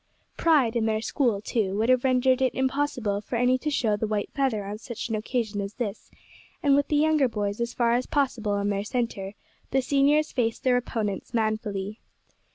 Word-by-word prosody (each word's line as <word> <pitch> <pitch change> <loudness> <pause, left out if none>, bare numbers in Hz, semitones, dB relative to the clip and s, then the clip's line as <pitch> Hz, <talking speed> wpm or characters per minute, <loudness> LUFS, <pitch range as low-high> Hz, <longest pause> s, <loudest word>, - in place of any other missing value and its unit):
Pride 280 -8 +3
in 225 -1 +1
their 215 -1 +1
school, 230 -2 0
too, 205 -3 -1
would 220 +2 +1
have 255 -1 +4
rendered 260 0 +3
it 260 -2 +1
impossible 260 -6 0
for 225 - -5
any 250 +2 +3
to 305 - -2
show 230 -7 +1
the 215 +1 -2
white 210 -1 -2
feather 255 -7 0
on 205 +2 -5
such 235 0 -6
an 225 - 0
occasion 215 -1 -2
as 200 +1 -6
this, 220 -5 -5 0.5
and 280 -2 +5
with 285 0 +2
the 300 - 0
younger 305 -2 +3
boys 205 -1 -3
as 235 0 -2
far 235 -1 +2
as 250 +1 0
possible 240 -8 0
in 200 0 0
their 200 0 -1
centre, 215 -4 -3 0.3
the 265 - +2
seniors 285 +3 +2
faced 230 -3 -1
their 255 -1 +3
opponents 220 -4 -2
manfully. 215 -2 -2
235 Hz, 195 wpm, -26 LUFS, 210-260 Hz, 0.5 s, and